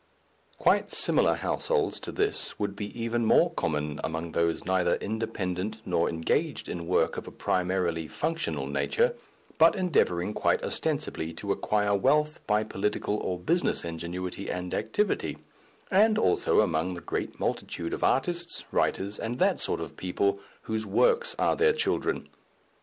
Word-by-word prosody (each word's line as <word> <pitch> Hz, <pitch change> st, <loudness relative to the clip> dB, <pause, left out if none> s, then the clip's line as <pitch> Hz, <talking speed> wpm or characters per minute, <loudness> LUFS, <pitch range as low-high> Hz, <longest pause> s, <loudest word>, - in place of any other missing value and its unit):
Quite -, -, +3 dB
similar -, -, +3 dB
households 455 Hz, -5 st, 0 dB
to -, -, -6 dB
this 420 Hz, 0 st, -1 dB
would 100 Hz, -1 st, -2 dB
be 105 Hz, 0 st, -4 dB
even 115 Hz, +1 st, 0 dB
more 170 Hz, +9 st, +4 dB
common 75 Hz, -, -2 dB
among 80 Hz, +1 st, -3 dB
those 85 Hz, 0 st, 0 dB
neither 95 Hz, -1 st, +2 dB
independent 110 Hz, -2 st, -3 dB
nor 85 Hz, -2 st, +1 dB
engaged 80 Hz, -1 st, -1 dB
in 85 Hz, -1 st, -5 dB
work 90 Hz, -, +2 dB
of -, -, -6 dB
a -, -, -7 dB
primarily 90 Hz, -3 st, 0 dB
functional 85 Hz, -, -2 dB
nature, 70 Hz, 0 st, +1 dB, 0.5 s
but 165 Hz, +1 st, +7 dB
endeavouring 105 Hz, -, +1 dB
quite -, -, +1 dB
ostensibly 80 Hz, +1 st, -2 dB
to 100 Hz, +4 st, -4 dB
acquire 105 Hz, 0 st, +1 dB
wealth 150 Hz, +8 st, +2 dB
by 105 Hz, 0 st, +3 dB
political 105 Hz, 0 st, -1 dB
or 90 Hz, -3 st, -2 dB
business 165 Hz, -, +1 dB
ingenuity 90 Hz, +3 st, -5 dB
and 90 Hz, 0 st, -4 dB
activity, 210 Hz, 0 st, 0 dB, 0.5 s
and 215 Hz, +3 st, +5 dB
also -, -, +3 dB
among 90 Hz, -2 st, 0 dB
the 85 Hz, -, -7 dB
great -, -, -4 dB
multitude 85 Hz, 0 st, -2 dB
of -, -, -3 dB
artists, 170 Hz, +5 st, +1 dB
writers, 100 Hz, +2 st, 0 dB
and 120 Hz, +2 st, -3 dB
that -, -, +2 dB
sort -, -, 0 dB
of -, -, -7 dB
people, 100 Hz, +2 st, 0 dB, 0.2 s
whose 110 Hz, 0 st, -2 dB
works 480 Hz, -, +2 dB
are -, -, +2 dB
their 450 Hz, 0 st, +4 dB
children. 455 Hz, 0 st, -1 dB
100 Hz, 145 wpm, -28 LUFS, -, 0.5 s, but